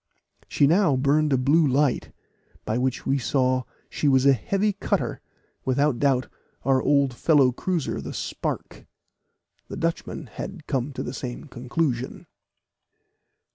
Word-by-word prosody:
She 145 - +3
now 165 -1 +4
burned 145 +3 +2
a 135 - +4
blue 145 +5 +3
light, 135 0 +1 0.5
by 110 +3 -1
which 130 0 -1
we 135 +1 +1
saw 130 -1 +1 0.2
she 150 - -2
was 130 -1 +4
a 140 - +7
heavy 200 - 0
cutter - - -2 0.4
without 135 0 +1
doubt 135 -3 +2 0.4
our 130 0 +3
old 140 -2 +2
fellow 140 0 +4
cruiser 170 +4 -2
the - - -6
Spark. - - -5 0.8
The - - -7
Dutchman 165 -1 -3
had 155 - -8
come 135 -1 -1
to - - -4
the 125 - -5
same 125 -2 -6
conclusion. 130 -1 -3
135 Hz, 135 wpm, -25 LUFS, 130-150 Hz, 0.8 s, a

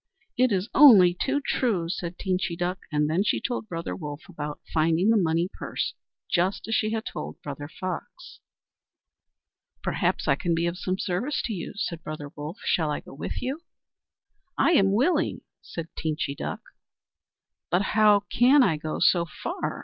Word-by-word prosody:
"It 255 -1 +3
is 190 0 0
only 210 -12 +8
too 270 +10 -1
true," 200 -10 0
said 175 0 -4
Teenchy 185 -2 -1
Duck, 180 +1 -2
and 150 0 +2
then 165 +6 +1
she - - +1
told 240 -3 -3
Brother 165 -1 -4
Wolf 150 -3 -7
about 150 -5 -6
finding 165 +6 +3
the - - +4
money 170 -3 +2
purse, - - -3 0.3
just 185 +4 0
as 225 - -2
she 215 0 +2
had 220 0 -2
told - - -6
Brother 145 0 -6
Fox. 180 +2 -7 1.4
"Perhaps - - 0
I - - +5
can 165 +4 0
be 165 +1 0
of 170 +1 -2
some 185 0 -1
service 200 +11 -1
to 225 - -2
you," 175 -5 -5
said 180 -5 -3
Brother 150 -2 -7
Wolf. 150 +6 -6
"Shall 160 -3 +1
I 150 - -1
go - - -13
with 140 - -5
you?" 270 +6 -3 1.0
"I - - +4
am 195 - +4
willing," 300 - +1 0.2
said 165 -1 -6
Teenchy 155 -3 -2
Duck. - - -5 1.1
"But 180 +4 +2
how 210 -2 +5
can 255 +7 +4
I 165 -8 +2
go 155 0 -4
so 170 -2 +4 0.2
far?" - - -3
180 Hz, 170 wpm, -26 LUFS, 160-215 Hz, 1.4 s, only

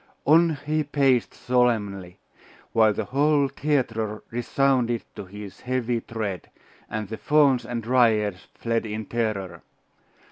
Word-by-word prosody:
On 165 +1 +5
he 155 +1 0
paced 135 -4 +2
solemnly, 105 -8 0 0.6
while 110 -1 +5
the 105 +1 -3
whole 140 +3 +2
theatre 120 -7 -1
resounded 120 0 +1
to - - -7
his 100 0 -10
heavy 125 -2 -1
tread, 105 -7 -5 0.4
and 110 -1 -4
the 110 - -6
Fauns 140 -5 +3
and 120 -2 -4
Dryads 110 -5 +2
fled 115 -1 -1
in 110 +1 -4
terror. 100 -7 -3
115 Hz, 120 wpm, -25 LUFS, 105-135 Hz, 0.6 s, On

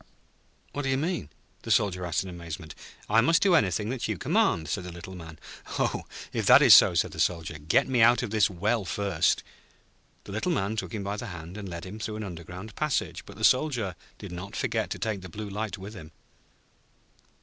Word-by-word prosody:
'What 145 - -2
do 135 - -2
you 130 - +2
mean?' 150 - -2 0.3
the - - -8
Soldier 90 -3 +2
asked 85 +1 0
in 95 - -8
amazement. 85 -2 -7 0.3
'I 115 - +5
must 165 +8 +4
do 195 -3 +4
anything 105 - +2
that 130 -1 -2
you - - -2
command,' 80 -2 +1
said 90 +5 -2
the 90 - -6
Little 85 +2 -9
Man. 80 -3 -10 0.4
'Oh, - - 0 0.3
if - - -1
that - - +8
is - - +9
so,' - - +8
said - - +2
the - - -9
Soldier, 80 -3 0
'get 75 +3 +2
me 130 -3 +2
out 120 0 +6
of - - -4
this 110 -3 +3
well 105 +4 0
first.' 95 -3 +1 0.8
The - - -10
Little 110 - -1
Man 110 -6 -1
took 95 -5 -4
him 105 - -3
by 100 +1 -3
the 120 - -5
hand, 90 -2 -8
and 100 -2 -6
led 85 0 -6
him 100 +4 -8
through 110 -1 -4
an 110 - -4
underground 90 +2 -8
passage; 150 -2 -2
but - - -11
the - - -7
Soldier 125 -9 +2 0.2
did 100 -3 -9
not 90 +3 -7
forget - - -1
to - - -3
take 110 -4 -2
the 90 - -9
Blue 105 +5 -6
Light 105 -1 -3
with 100 +3 -9
him. 80 -7 -10
100 Hz, 215 wpm, -27 LUFS, 85-110 Hz, 0.8 s, is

